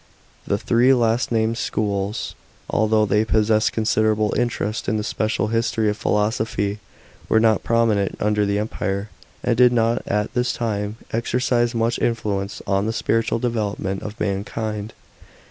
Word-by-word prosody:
The 100 - +1
three 120 +5 +3
last 120 0 +1
named 115 +1 +1
schools, 100 0 -2 0.3
although 110 0 +2
they 105 +1 +2
possess 110 0 +2
considerable 110 -1 +1
interest 120 -2 -1
in 110 - +1
the 105 - -2
special 110 0 -1
history 115 -1 +1
of - - -4
philosophy, 105 -1 0 0.5
were 110 - +4
not 110 -2 +3
prominent 115 -4 +1
under 105 0 +1
the 100 0 0
Empire, 105 -1 -3 0.3
and 120 - +2
did 125 +1 +6
not 115 0 +2
at 105 +1 -1
this 125 0 0
time 105 -2 -2 0.2
exercise 120 +1 +1
much 115 +1 0
influence 105 -4 -2
on 100 +1 +1
the 110 - -1
spiritual 115 0 0
development 105 -5 -2
of 105 0 -7
mankind. 105 +2 -3
110 Hz, 145 wpm, -22 LUFS, 105-115 Hz, 0.5 s, did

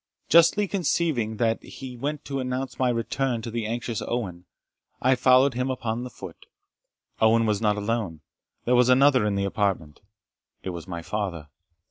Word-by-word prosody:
Justly 170 +5 +5
conceiving 160 - 0
that 115 -1 +1
he 130 -2 -9
went 145 +4 -4
to 135 -1 -3
announce 130 +1 -4
my 130 -1 +2
return 120 0 -1
to 115 - -5
the 115 -1 -3
anxious 115 -1 -3
Owen, 95 -7 -4 0.5
I 130 +1 +3
followed 130 +1 +4
him 125 +2 -1
upon 120 -2 -3
the 125 - -6
foot. - - -11 0.7
Owen 115 +1 +4
was 105 -1 0
not 105 -2 +2
alone, 105 -7 -2 0.4
there 125 - +2
was 125 0 +4
another 130 -3 +5
in 100 - 0
the 100 0 0
apartment 95 -7 -1 0.6
it 95 - -3
was 85 0 -8
my 85 -2 -6
father. 85 -7 -4
115 Hz, 165 wpm, -25 LUFS, 105-130 Hz, 0.7 s, Justly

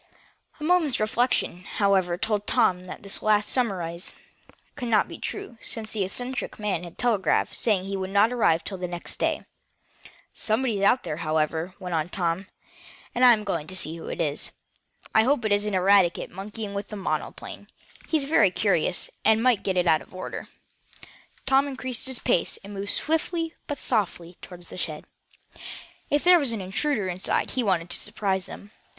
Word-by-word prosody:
A - - -7
moment's 320 -5 +2
reflection, 215 -4 +1
however, 190 -4 +1
told 210 +1 -1
Tom 185 -7 +3
that 185 - -9
this 200 - +2
last 210 -1 +3
surmise 180 -8 -1 0.6
could 245 - -4
not 225 -2 +3
be - - -9
true, 395 - -5
since 220 -2 -2
the 210 -3 0
eccentric 245 +7 -3
man 205 -5 -2
had 170 -1 -10
telegraphed, 210 -9 +2
saying 205 -5 +3
he 195 0 -3
would 190 -1 -3
not 205 +4 +4
arrive 170 -9 +3
until 190 -2 -5
the 180 - -2
next 175 -1 -5
day. - - 0 0.9
"Somebody's 220 -2 0
out 240 +6 +4
there, 155 -3 -4
however," 160 +2 -1
went 180 -1 -5
on 160 0 0
Tom, 180 +1 -1 0.7
"and 245 - +1
I'm 235 -4 +7
going 170 -7 -2
to 185 - -5
see 165 -3 +1
who 165 - -9
it - - -5
is. 150 -3 0 0.6
I 220 - +6
hope 245 0 +2
it 215 - +1
isn't 205 +1 +2
Eradicate 185 -1 +3
monkeying 205 +2 -6
with 200 0 -4
the 210 - -7
monoplane. 195 -2 -4 0.4
He's 315 -3 +2
very 275 -9 +4
curious, 180 -3 +1
and 220 0 +5
he - - -1
might 250 -5 +4
get 190 -2 -1
it 180 - +3
out 160 -2 +4
of - - -15
order." 185 - -6 1.0
Tom 270 +1 +4
increased 260 -2 -3
his 260 -2 0
pace, 170 - +1
and 200 +1 -9
moved 200 0 -4
swiftly 325 - 0
but 290 - -3
softly 185 -8 -1
toward 175 -1 -11
the 175 - -8
shed. 155 -3 -3 1.0
If 290 0 +2
there 355 0 +7
was 275 -6 -1
an 225 - -3
intruder 205 +3 0
inside 185 +1 0
he 255 - 0
wanted 180 -6 0
to - - +1
surprise 195 -3 -1
him. 205 - -10
200 Hz, 180 wpm, -26 LUFS, 180-240 Hz, 1.0 s, I'm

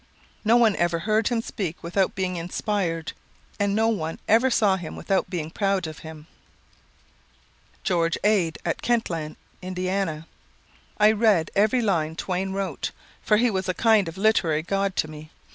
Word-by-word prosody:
No 225 +2 +5
one 225 -4 +4
ever 175 -1 +1
heard 215 +5 +1
him 235 -2 0
speak 180 -8 -5
without 180 +3 0
being 185 -1 -2
inspired, 170 -1 -2 0.5
and 200 0 +1
no 225 +1 +3
one 165 -8 -2
ever 230 +5 +4
saw 210 -5 +3
him 180 -4 -7
without 195 -1 -1
being 165 -4 -4
proud 195 -2 0
of 155 -1 -7
him." 160 -1 -10 1.6
George 170 -2 +1
Ade, 195 -7 +2
at - - -1
Kentland, 170 -10 -1 0.3
Ind: 185 -3 -2 0.7
"I 210 0 +6
read 210 -7 +2
every 220 +5 +3
line 160 -6 0
Twain 190 +2 -2
wrote, 195 0 -3 0.3
for 210 - +3
he 240 +1 +3
was 190 -1 -2
a 185 - 0
kind 220 -3 +3
of 165 - -7
literary 185 -7 +2
god 195 +1 -1
to - - 0
me. 155 0 -10
190 Hz, 160 wpm, -24 LUFS, 165-215 Hz, 1.6 s, I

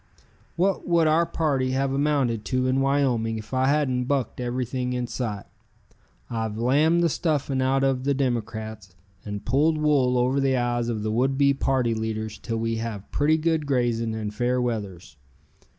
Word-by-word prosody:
What 190 +3 0
would 170 -2 +3
our 160 +2 +3
party 135 -5 0
have 135 0 0
amounted 135 -6 +1
to 130 -1 0
in 130 +1 +1
Wyoming 130 -5 +1
if 110 +3 -9
I 130 0 +2
hadn't 135 -4 +1
Bucked 135 -2 -1
everything 125 +1 -2
in 125 0 -1
sight? 115 -5 -4 0.8
I've 110 -2 -3
Lambed 150 +8 +3
the - - +4
stuffing 145 -4 -1
out 135 +1 +2
of 135 -2 +1
the 140 +1 +1
Democrats 110 -6 -3 0.3
and 105 -1 -6
Pulled 150 +6 +2
Wool 140 -5 +2
over 125 +3 +2
the 135 -1 +2
eyes 120 -1 0
of 110 -3 -2
the 110 - -1
would 130 +4 +1
be 140 0 +4
party 130 -3 +1
leaders 110 -1 -4
till 115 -1 -3
we 115 0 -1
have 110 -3 -5
Pretty 155 +2 +2
Good 160 -2 0
Grazing 120 -4 0
and 105 -1 -4
Fair 125 +3 0
We(a)thers. 100 -9 -4
125 Hz, 170 wpm, -25 LUFS, 115-140 Hz, 0.8 s, the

